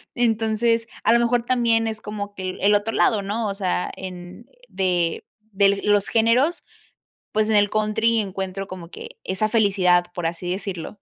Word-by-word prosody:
entonces 230 0 +1 0.2
a - - +4
lo 235 - +5
mejor 235 0 +1
también 230 -2 +2
es 220 -1 -4
como 205 -1 -6
que 190 - -7
el - - -11
el 205 +2 +4
otro 205 +2 +1
lado, 215 -4 +2
¿no? 210 +3 -2
O - - -2
sea, 185 -2 -2
en 185 +3 -9 0.2
de 175 -3 -1 0.3
de 200 0 +3
los 205 -1 +2
géneros, 245 +9 +2 0.7
pues 215 0 +2
en 220 - +1
el 205 -1 +4
country 220 +2 +1
encuentro 195 -1 -4
como 185 -3 -9
que - - -11
esa 200 +3 0
felicidad, 190 -5 +3
por 175 -2 -2
así 175 +1 -4
decirlo. 185 -3 -4
205 Hz, 175 wpm, -22 LUFS, 190-225 Hz, 0.7 s, lo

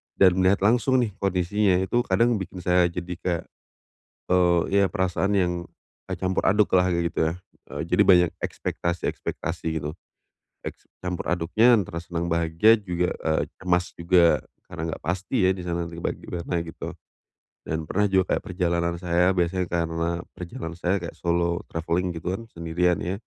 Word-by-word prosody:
dan 95 -2 +6
melihat 95 +1 +3
langsung 120 +4 +3
nih 110 - -2
kondisinya 95 +1 +1
itu 95 +6 +1
kadang 115 -2 +2
bikin 95 -1 -7
saya 90 0 +4
jadi 90 +1 -5
kayak, 85 -4 -1 0.8
eee, 90 -1 +4 0.2
ya - - +4
perasaan 95 +2 0
yang, 90 -1 +1 0.7
campur 95 0 0
aduk 105 +2 +4
lah 90 0 +4
kaya 85 - +1
gitu - - -4
ya, - - -4 0.4
eee, - - -4
jadi - - +3
banyak 90 -2 +6
ekspektasi-ekspektasi 85 -1 -3
gitu, 75 +1 -5 0.7
eks - - -8 0.2
campur 90 -2 -3
aduknya 100 +8 +4
antara 85 -4 -3
senang 85 0 -4
bahagia 85 +5 +4
juga, 90 -2 -1
eee, 80 -1 +1 0.2
cemas 90 -1 0
juga 85 -4 +3 0.2
karena 85 0 -5
enggak - - -6
pasti 95 - 0
ya 95 - +4
di 95 - -7
sana 85 0 -1
gimana-gimana 85 0 -4
gitu, 80 - -7 0.7
dan 80 0 -2
pernah 105 +6 +1
juga 95 -1 +2
kayak - - -1
perjalanan 85 -2 0
saya 90 0 +2
biasanya 90 +1 +1
karena 85 0 -1 0.2
perjalanan 85 -2 -7
saya 90 +2 +1
kayak 85 -3 -6
solo 85 0 0
travelling 85 +2 -1
gitu 85 +3 -3
kan 115 +4 -6
sendirian 85 0 0
ya, 90 +3 -2
90 Hz, 155 wpm, -25 LUFS, 85-95 Hz, 0.8 s, dan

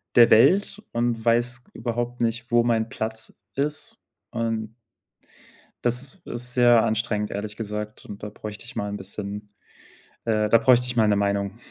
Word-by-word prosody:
der 120 -1 +8
Welt 195 - +4
und 120 -1 0
weiß 120 +2 +2
überhaupt 120 +1 -3
nicht, 115 +1 -1
wo 120 0 +5
mein 115 -1 +1
Platz 110 0 -4 0.2
ist 145 +2 -2 0.3
und 115 -1 -2 1.1
das 125 +6 0
is - - -6
ist 120 +1 -3
sehr 120 -2 +6
anstrengend, 110 -1 0
ehrlich 105 +1 -4
gesagt, 105 -1 -5
und 100 -1 -9
da 105 - -4
bräuchte 105 +1 -8
ich 120 - -10
mal 105 - -2
'n 100 - -4
bisschen 100 +1 -6 0.8
äh, 110 -2 +1
da 115 - +7
bräuchte 125 +2 +4
ich 125 - -3
mal 110 -2 +4
'ne 105 - +3
Meinung. 100 -1 0
115 Hz, 165 wpm, -25 LUFS, 105-120 Hz, 1.1 s, der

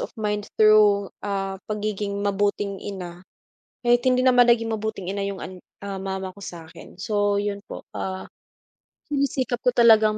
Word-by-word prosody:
of - - -3
mind 210 -1 -2
through, 210 -2 +5
ah, 195 -1 -3
pagiging 210 -1 -2
mabuting 200 0 0
ina. 180 -3 -7 0.6
Kahit 240 0 +5
hindi 255 0 +4
naman 250 -1 +6
naging 230 -1 +3
mabuting 215 -4 -3
ina 200 0 -2
yung 200 -1 -5
an 185 0 -7 0.4
mama 190 0 -4
ko 185 - -17
sa'kin. 170 -5 -10
So 205 -1 +1
yun 200 0 -1
po, - - -8 0.2
ah, 190 0 -4 0.8
sinisikap 275 -4 -1
ko - - +3
talagang 220 -3 +5
205 Hz, 145 wpm, -24 LUFS, 195-225 Hz, 0.8 s, naman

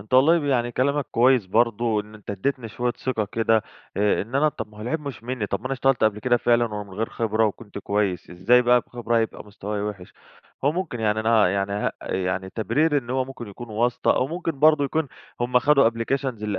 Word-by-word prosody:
أنت 110 +5 -4
والله 145 +4 +5
يعني 120 -3 +1
كلامك 140 +2 0
كويس 125 -3 +3
برضو 115 +1 +1
إن 105 +1 -12
أنت 105 -1 -9
اديتني 115 +4 -2
شوية 120 +3 -2
ثقة 120 -3 -2
كده، 115 -1 +2 0.3
آآ، 105 -1 +2
إن 115 +6 -11
أنا 150 +2 +4
طب 125 - -6
ما 105 - -16
هو 105 - -7
العيب 125 +7 -2
مش 140 -6 -7
منّي، 125 -4 -3
طب 100 - -3
ما 130 - -6
أنا 135 - -2
اشتغلت 135 -2 +2
قبل 105 -1 +2
كده 125 -2 +3
فعلًا 120 -2 +1
ومن 105 -1 -6
غير 110 +2 -2
خبرة 110 -1 +1
وكنت 105 0 -6
كويس، 100 -3 -1
إزاي 110 +8 +4
بقى 125 0 +4
بخبرة 120 -1 -3
هيبقى 110 -2 -3
مستوايا 105 0 -5
وحش؟ 100 -4 -6 0.5
هو 145 - +3
ممكن 170 -9 -4
يعني 110 0 +1
أنا 110 -4 +4
يعني 100 +1 -1
ه 105 - -1 0.2
يعني 95 0 -2
تبريري 145 +8 +1
إن 120 -2 -8
هو 130 0 +1
ممكن 130 -3 -9
يكون 115 +3 -10
واسطة 120 +3 +1
أو 130 - +2
ممكن 165 -1 -4
برضو 155 -2 +5
يكون 155 0 -1 0.3
هُم 125 +1 +3
خدوا 140 -2 +4
applications 115 +4 -2 0.2
اللي 105 -1 -2
115 Hz, 215 wpm, -24 LUFS, 105-130 Hz, 0.5 s, والله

